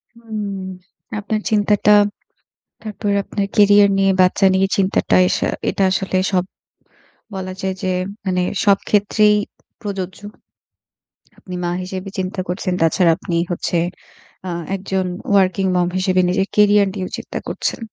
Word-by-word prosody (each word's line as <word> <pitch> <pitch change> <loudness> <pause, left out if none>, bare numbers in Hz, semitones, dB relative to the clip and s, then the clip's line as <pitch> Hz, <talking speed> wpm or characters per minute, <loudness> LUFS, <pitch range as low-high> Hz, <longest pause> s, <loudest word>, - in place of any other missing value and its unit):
হুম। 210 -4 -5 0.5
আপনার 215 +1 -2
চিন্তাটা, 210 -1 +3 0.9
তারপরে 210 -1 -3
আপনার 200 -1 -2
কেরিয়ার 205 -1 +6
নিয়ে, 195 0 +3
বাচ্চা 185 +2 +4
নিয়ে 190 +1 +3
চিন্তাটা 195 -1 +2
এসা - - 0 0.2
এটা - - -2
আসলে 190 0 -1 0.2
সব 180 -1 +2 0.9
বলা 185 -1 -5
যায় 190 -1 -2
যে 190 - 0 0.4
মানে 180 -1 +1 0.2
সবক্ষেত্রেই 210 +1 +3 0.5
প্রযোজ্য। 195 -4 -5 1.2
আপনি 180 - -9
মা 175 - -1
হিসেবে 185 +1 -6
চিন্তা 185 0 -3
করছেন। 185 +1 -2
তাছাড়া 165 +2 +3
আপনি 170 - -3
হচ্ছে 175 0 -1 0.7
আ - - -3 0.3
একজন 190 -1 -2 0.3
working 190 0 +2
mom 175 -1 +2
হিসেবে 185 0 +2
নিজের 190 +2 0
কেরিয়ার 205 -1 +5
নিয়েও 190 -2 -4
চিন্তা - - -6
করছেন। - - -3
195 Hz, 125 wpm, -19 LUFS, 185-205 Hz, 1.2 s, কেরিয়ার